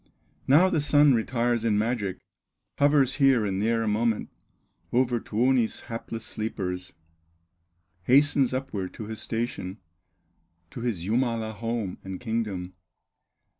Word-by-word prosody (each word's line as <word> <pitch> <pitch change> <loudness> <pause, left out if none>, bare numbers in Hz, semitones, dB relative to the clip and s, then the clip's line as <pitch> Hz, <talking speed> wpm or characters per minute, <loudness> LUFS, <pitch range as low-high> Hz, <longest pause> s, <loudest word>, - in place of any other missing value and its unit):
Now 155 +8 +6
the 160 -5 +1
Sun 145 0 +5
retires 120 0 0
in 110 -3 +2
magic, 105 -3 -1 0.6
Hovers 140 -2 +4
here 135 -6 +4
and 95 -1 -1
there 115 +1 +1
a - - -2
moment 110 +1 0 0.6
Over 125 -1 +2
Tuoni's 120 +1 +1
hapless 115 -1 -6
sleepers, 95 -5 -4 1.1
Hastens 140 0 +4
upward 130 -8 -4
to 110 - -6
his 110 0 -6
station, 110 -4 -3 0.9
To - - -7
his 115 -8 -2
Jumala 115 0 0
home 115 -3 -3
and 95 -1 -6
kingdom. 105 -6 -3
115 Hz, 120 wpm, -26 LUFS, 105-130 Hz, 1.1 s, Now